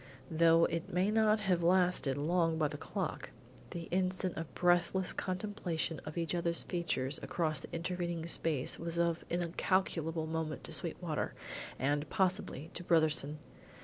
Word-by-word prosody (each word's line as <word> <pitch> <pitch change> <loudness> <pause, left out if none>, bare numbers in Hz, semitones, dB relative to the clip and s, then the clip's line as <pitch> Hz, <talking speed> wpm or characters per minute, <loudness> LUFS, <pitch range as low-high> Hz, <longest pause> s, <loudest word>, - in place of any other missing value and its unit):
Though 165 +1 +5
it 165 +1 -3
may 185 +4 +2
not 215 -1 +3
have 185 -4 +1
lasted 175 -6 +3
long 165 +2 +1
by 155 -2 +1
the 150 - -6
clock, - - -4 0.4
the 170 - -5
instant 185 0 0
of 165 -1 -5
breathless 180 +1 +2
contemplation 185 -4 -2
of 155 +2 -7
each 165 0 -1
other's 170 -1 +1
features 150 -6 +1
across 155 -3 -1
the - - -9
intervening 170 -1 -3
space 160 -5 +1
was 170 0 -2
of 170 -1 +1
incalculable 170 -2 0
moment 160 -1 -3
to - - -9
Sweetwater, - - -1 0.4
and, 145 +2 0
possibly, 185 -5 -1
to 175 - -5
Brotherson. 155 -3 +2
170 Hz, 145 wpm, -33 LUFS, 160-180 Hz, 0.4 s, Though